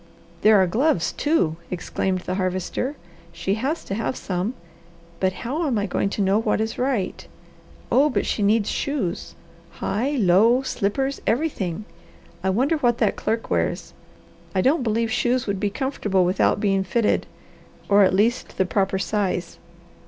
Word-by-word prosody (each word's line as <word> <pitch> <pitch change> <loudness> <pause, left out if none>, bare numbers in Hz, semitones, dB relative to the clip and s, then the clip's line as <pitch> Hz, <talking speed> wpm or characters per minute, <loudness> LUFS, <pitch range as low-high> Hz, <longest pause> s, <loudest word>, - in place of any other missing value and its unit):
"There 215 -1 +6
are 190 - +5
gloves, 215 - +1
too!" 235 - +1
exclaimed 185 +1 -2
the 180 - -4
Harvester. 185 +8 -2 0.4
"She 170 +3 -2
has 270 +10 -2
to - - -5
have 225 +5 -2
some, 190 +5 -3 0.6
but 190 0 +2
how 270 - -3
am 250 -5 0
I 205 - 0
going 195 - -1
to 205 - -1
know 195 +2 +3
what 215 -1 0
is 220 0 -2
right? 250 -7 -1 0.6
Oh, 285 +3 +5
but - - 0
she - - -1
needs 205 +1 +3
shoes! 270 - -2 0.4
High, 250 +8 -1
low, 225 +2 +4
slippers, 265 +4 -1
everything! 215 - -1 0.6
I 190 - +1
wonder 260 - +2
what 240 -5 +2
that 225 -4 +1
clerk 225 +1 -2
wears. - - -1 0.6
I 185 - +3
don't 275 - +3
believe 230 -1 0
shoes 245 +1 +1
would 200 -2 -2
be 205 0 0
comfortable 205 -6 0
without 185 +3 +2
being 195 -2 +1
fitted, 210 +4 +1 0.6
or 205 0 +5
at 190 -1 +4
least 230 +5 0
the 190 - +2
proper 190 0 0
size. 190 -3 -2
210 Hz, 160 wpm, -23 LUFS, 190-250 Hz, 0.6 s, There